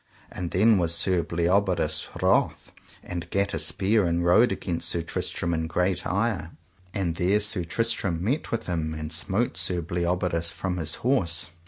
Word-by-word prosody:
And 90 -2 -4
then 105 +3 +4
was 85 -1 +1
Sir 90 +1 +2
Bleoberis 85 -1 +1 0.2
wroth, - - +2 0.3
and 85 -1 -6
gat 100 0 0
a - - -1
spear 100 0 +2
and 85 +1 0
rode 110 +7 +5
against 90 -3 -2
Sir 85 - -1
Tristram 85 +1 -2
in 80 -1 -1
great 90 +2 0
ire; 100 -4 0 0.4
and 90 -5 -2
there 95 +3 +3
Sir 105 -3 -1
Tristram 95 -2 -1
met 130 +10 -1
with 115 - -2
him, 80 -3 -2
and 75 +1 -5
smote 95 +8 0
Sir 90 -1 0
Bleoberis 85 0 -1
from 90 -2 -3
his 80 -2 -1
horse. 85 -11 +1
90 Hz, 165 wpm, -26 LUFS, 85-100 Hz, 0.4 s, rode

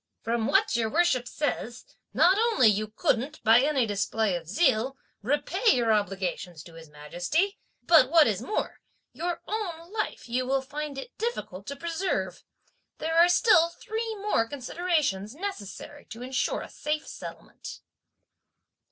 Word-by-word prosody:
From 230 0 0
what 220 - +2
your 225 -2 +1
worship 290 -5 +2
says, 250 -5 -3 0.3
not 355 +4 +5
only 455 - +4
you 215 0 +2
couldn't, 245 +6 -1
by 225 +2 +6
any 275 -3 +2
display 205 -1 0
of 165 -2 -6
zeal, 265 - +1 0.2
repay 295 - +2
your 230 -3 +2
obligation 190 -4 -2
to 160 +2 -12
His 165 -1 -12
Majesty, 175 - -2 0.2
but, 310 -7 +6
what 325 -1 +6
is 215 -3 0
more, 425 - -3 0.3
your 345 0 -4
own 365 -4 -4
life 425 - -3
you 250 +2 -1
will 270 0 +1
find 290 +1 -6
it 375 - -8
difficult 215 - -4
to 280 - -4
preserve. 325 - -3 0.5
There 320 +1 -3
are 340 +1 +6
still 355 -3 +5
three 445 +5 -5
more 400 - 0
considerations 275 - -1
necessary 290 - -7
to 230 +2 -9
insure 260 +1 -1
a - - -8
safe 300 +1 -3
settlement." - - -9
270 Hz, 145 wpm, -27 LUFS, 220-340 Hz, 0.5 s, by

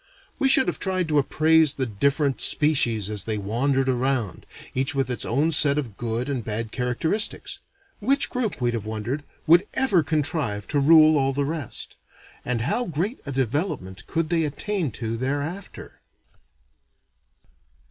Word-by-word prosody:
We 270 - +3
should 265 - +5
have - - -2
tried 185 -3 -1
to 150 -1 +3
appraise 155 +1 +3
the 130 - -1
different 140 +5 0
species 120 -9 +3
as 105 -2 -3
they 110 -1 -2
wandered 130 +7 0
around, 130 -4 -1 0.3
each 135 +3 0
with 135 -2 0
its 125 - -2
own 145 +7 +1
set 145 -2 +4
of 125 -9 -4
good 115 +2 -3
and 135 -5 -3
bad 110 +1 -4
characteristics. 140 - -1 0.4
Which 275 +1 +1
group, 250 -5 -2
we'd 120 -1 0
have 110 -2 -4
wondered, 110 +7 -4 0.2
would 170 +5 +5
ever 260 -10 +3
contrive 145 - -1
to 145 - +1
rule 155 +1 +6
all 135 0 +1
the 140 +1 -1
rest? 150 -4 -5 0.5
And 125 -2 -2
how 235 - -1
great 180 - -3
a - - -3
development 130 - -3
could 165 -1 -1
they 165 -1 +2
attain 160 +3 -2
to 115 0 -4
thereafter? 145 - -5
140 Hz, 155 wpm, -24 LUFS, 120-160 Hz, 0.5 s, rule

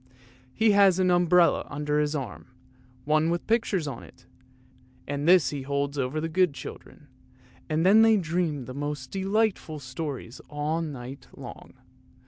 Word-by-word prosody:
He 220 -1 +4
has 200 -3 +5
an 185 -1 +2
umbrella 175 0 +4
under 150 0 -1
his 150 0 0
arm, 135 -3 -6 0.6
one 155 +2 +2
with 170 0 -2
pictures 215 -8 0
on 130 -5 -6
it, - - -17 0.8
and 145 +2 -3
this 180 -3 +5
he 145 -2 -4
holds 140 +1 -2
over 135 +2 -2
the 160 - -2
good 170 -2 +1
children, 145 - -10 0.6
and 160 +2 +1
then 210 +4 +7
they 225 -1 +6
dream 165 -6 -1
the 130 - -8
most 145 -2 -5
delightful 195 -4 0
stories 130 -2 -6
all 150 +2 -2
night 135 -4 -7
long. - - -11
155 Hz, 150 wpm, -26 LUFS, 145-180 Hz, 0.8 s, then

